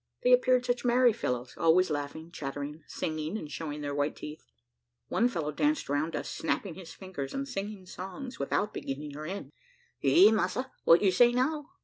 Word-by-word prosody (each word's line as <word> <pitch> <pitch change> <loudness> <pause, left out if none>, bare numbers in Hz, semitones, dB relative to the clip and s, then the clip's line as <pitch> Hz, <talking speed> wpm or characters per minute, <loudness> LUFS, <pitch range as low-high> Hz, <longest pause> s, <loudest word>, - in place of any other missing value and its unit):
They - - +6
appeared 255 - +4
such 245 -1 0
merry 245 -1 +5
fellows, 125 - -3
always 170 +1 +4
laughing, 150 +3 -4
chattering, 145 0 -5
singing 155 +4 -3
and 150 -8 -7
showing 150 +1 -5
their 145 -1 -3
white 145 +1 0
teeth. 150 +1 -9 0.6
One 235 - +3
fellow 160 -9 -2
danced 295 - 0
round 150 +3 0
us - - -3
snapping 175 +2 -2
his 175 -1 -10
fingers 180 -8 -6
and 275 0 -2
singing 205 -5 -5
songs 195 +9 -7
without 205 +9 0
beginning 145 +1 -5
or 155 +1 -6
end. 195 +3 -6 0.5
"Eh, 340 -9 +7
massa, 220 +5 0
what 165 +4 +7
you 195 - +5
say 240 +6 +6
now? 290 +5 0
180 Hz, 175 wpm, -30 LUFS, 150-245 Hz, 0.6 s, Eh